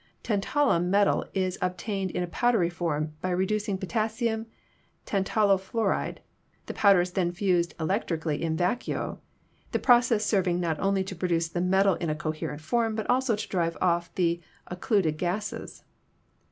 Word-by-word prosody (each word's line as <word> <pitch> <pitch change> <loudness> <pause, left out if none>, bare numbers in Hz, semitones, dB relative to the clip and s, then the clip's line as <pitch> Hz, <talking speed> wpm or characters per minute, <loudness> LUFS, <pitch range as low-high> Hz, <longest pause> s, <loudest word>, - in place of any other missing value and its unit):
"Tantalum 205 - +1
metal 200 +1 +3
is 185 -1 -1
obtained 190 +2 -2
in 180 - -2
a - - -3
powdery 200 -2 +1
form 155 -3 -2
by 185 - -1
re 180 +1 +1
ducing 210 -1 -1
potassium 220 +2 -1 0.6
tantalo 195 0 +2
fluoride; 220 +4 -1 0.5
the - - -5
powder 200 -3 +5
is 180 +1 -3
then 180 -2 0
fused 175 -2 0
electrically 160 -3 -1
in 160 -1 -1
vacuo, 180 +8 -1 0.5
the - - +3
process 240 -3 +4
serving 185 -4 +1
not 165 -3 -1
only 195 -1 +1
to 190 0 -7
produce 170 -2 0
the 175 +1 -2
metal 190 +2 +3
in 170 - -3
a 155 - 0
coherent 155 -1 -4
form 225 +7 0
but 220 - -3
also 255 -2 +2
to 210 - -5
drive 170 -3 -1
off 170 -1 +1
the 170 -1 +1 0.2
occluded 180 -4 0
gases. 210 +5 -4
185 Hz, 155 wpm, -27 LUFS, 170-210 Hz, 0.6 s, powder